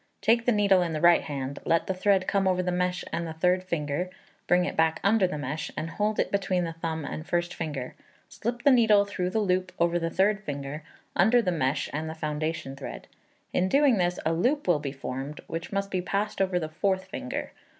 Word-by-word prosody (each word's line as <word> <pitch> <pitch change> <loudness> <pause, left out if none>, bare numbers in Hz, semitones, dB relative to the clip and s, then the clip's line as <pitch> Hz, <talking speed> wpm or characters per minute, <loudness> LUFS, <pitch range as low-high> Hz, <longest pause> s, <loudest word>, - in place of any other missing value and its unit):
Take 230 +4 +2
the - - +6
needle 200 -4 +4
in 170 -2 -1
the 155 - -1
right 175 +1 +6
hand; 140 -1 -5
let 165 0 +2
the 190 - -1
thread 190 0 +2
come 195 -2 +2
over 185 -1 +2
the 180 - -1
mesh 180 0 0
and 170 0 -2
the 160 - -5
third 180 +3 +2
finger, 170 0 -2 0.4
bring 180 0 +4
it - - -3
back 160 0 +2
under 200 -1 +4
the 165 - -4
mesh, 145 +2 -4
and 165 +1 -3
hold 210 +2 -1
it - - +1
between 190 -2 +1
the 165 -1 -3
thumb 160 -2 -4
and 155 - -5
first 175 0 0
finger. 145 -6 -4 0.3
Slip 240 +2 -4
the 285 - +6
needle 220 -5 +5
through 185 -3 -2
the 190 - -2
loop 185 -3 +1
over 170 0 +2
the 165 0 -1
third 200 +4 +2
finger, 140 -1 -5 0.3
under 245 +2 +5
the 195 -6 +1
mesh 145 -3 0
and 155 +2 -3
the 160 - -6
foundation 155 -2 -3
thread. 135 - -8 0.5
In 185 +1 +2
doing 275 -3 +4
this 175 0 +1
a 160 - +2
loop 250 - +1
will 170 -4 +4
be 145 -2 -4
formed, 135 +1 -6
which 165 +1 -5
must 200 0 -2
be 185 - 0
passed 200 +3 -2
over 185 -2 +1
the 160 -3 -2
fourth 190 +4 -1
finger. 155 -9 -5
180 Hz, 220 wpm, -27 LUFS, 160-195 Hz, 0.5 s, the